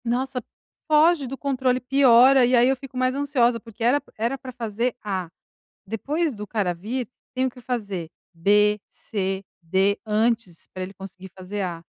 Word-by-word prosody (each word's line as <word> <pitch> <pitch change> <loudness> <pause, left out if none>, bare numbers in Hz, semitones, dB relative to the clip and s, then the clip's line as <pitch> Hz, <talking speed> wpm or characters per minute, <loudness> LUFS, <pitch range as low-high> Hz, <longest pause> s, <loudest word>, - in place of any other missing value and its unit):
Nossa, 250 +2 -1 0.5
foge 310 -1 +4
do 270 +2 -6
controle, 260 -2 0
piora 260 0 +6
e 250 +1 +3
aí 240 +1 +5
eu 270 - +3
fico 265 -1 -10
mais 255 0 +2
ansiosa, 260 -4 +2
porque 225 0 -9
era 265 +5 +3
p - - -24
era 235 +5 -1
pra 260 -1 -9
fazer 235 0 -2
"A". 190 -4 -3 0.6
Depois 290 - -1
do 210 0 -7
cara 200 -5 0
vir, 220 +7 -4 0.3
tenho 260 0 +1
que 250 - -15
fazer 205 -9 -4 0.2
"B", 210 +4 +3
"C", 195 -2 -3 0.2
"D", 190 +4 +1
antes, 215 -4 0
pra 185 - -5
ele 190 +2 -9
conseguir 190 0 -10
fazer 195 +2 -5
"A". 170 -3 -4
235 Hz, 170 wpm, -24 LUFS, 200-260 Hz, 0.6 s, piora